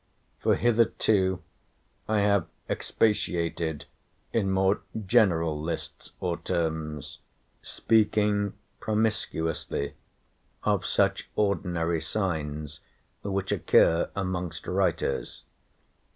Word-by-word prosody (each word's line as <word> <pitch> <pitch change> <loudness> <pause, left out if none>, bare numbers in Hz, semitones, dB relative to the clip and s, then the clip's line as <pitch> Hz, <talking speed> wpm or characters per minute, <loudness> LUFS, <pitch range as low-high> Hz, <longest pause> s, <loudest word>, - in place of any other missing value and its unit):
For - - +3
hitherto 110 -5 +2 0.6
I 110 -1 +2
have 100 -3 +3 0.2
expatiated 85 -7 0 0.5
in 100 -4 +1
more 95 +1 +2 0.2
general 85 -6 +3
lists 80 +2 -5
or 90 -2 -1
terms, 80 -4 -3 0.4
speaking 105 -2 +2 0.3
promiscuously 80 -9 -1 0.7
of - - +1
such - - +1
ordinary 85 -5 0
signs, 75 -5 -3 0.4
which 100 -1 -2
occur 85 +1 +4
amongst 90 -4 -3
writers. 90 -2 -1
90 Hz, 80 wpm, -27 LUFS, 80-105 Hz, 0.7 s, occur